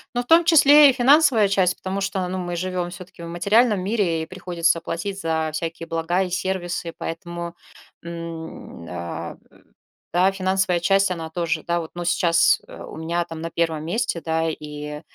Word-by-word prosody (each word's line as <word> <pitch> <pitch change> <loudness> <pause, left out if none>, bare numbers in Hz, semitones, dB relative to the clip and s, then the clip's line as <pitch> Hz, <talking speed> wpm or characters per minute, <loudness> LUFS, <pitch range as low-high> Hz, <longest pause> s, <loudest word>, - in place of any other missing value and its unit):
Ну, 245 - +1
в - - -9
том 330 +3 +6
числе 295 -3 +7
и - - -5
финансовая 265 -3 +5
часть, 190 -2 +2
потому 190 +1 -4
что, 195 -2 -2
ну, 185 +1 -3
мы 175 -1 -4
живем 180 0 -3
всё-таки 175 -1 -11
в - - -6
материальном 205 +6 +2
мире 190 -6 0
и - - -4
приходится 175 -2 0
платить 180 +4 -4
за 160 -3 -1
всякие 165 +1 -4
блага 165 +3 0
и 185 - -1
сервисы, 175 -2 -3
поэтому, 170 +1 -6 0.5
м, 165 - -8
а. 85 0 -6 0.8
Да, 185 +2 +4
финансовая 190 -1 0
часть- 195 +2 +3
она 165 -2 -5
тоже, 165 -2 -2
да, 170 0 0
вот, 160 -1 -7
ну, 175 0 -4
сейчас 170 -1 +3
у - - -10
меня, 170 +2 -2
там, 165 -1 -8
на 165 - -4
1 165 -2 -1
месте, 180 -1 -1
да, 160 0 -1
и 150 -1 -7
175 Hz, 175 wpm, -22 LUFS, 165-195 Hz, 0.8 s, числе